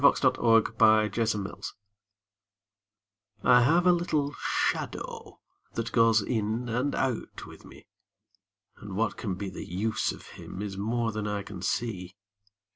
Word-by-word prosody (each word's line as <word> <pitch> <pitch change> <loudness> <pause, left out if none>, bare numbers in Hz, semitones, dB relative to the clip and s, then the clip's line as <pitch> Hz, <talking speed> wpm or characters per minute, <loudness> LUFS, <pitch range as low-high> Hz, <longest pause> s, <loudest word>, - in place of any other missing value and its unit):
[Pg 140 - +6 0.2
20] 115 -3 +3
MY 110 -1 +5
SHADOW 105 -4 -1 1.8
I 125 0 +6
have 165 +8 +4
a 180 - +7
little 155 -5 0
shadow - - -3 0.4
that 115 0 -2
goes 115 -2 +4
in 110 +2 -1
and 125 +5 -1
out 130 -4 -2
with - - -13
me, - - -14 0.9
And 100 -3 -8
what 115 +3 0
can 100 -5 -3
be 95 0 -5
the - - -7
use 105 +5 0
of - - -11
him 90 - -9
is 100 -1 -4
more 115 +3 -1
than 105 -1 -3
I 105 -1 -2
can 95 -3 -9
see. 95 -3 -2
110 Hz, 140 wpm, -28 LUFS, 105-120 Hz, 1.8 s, a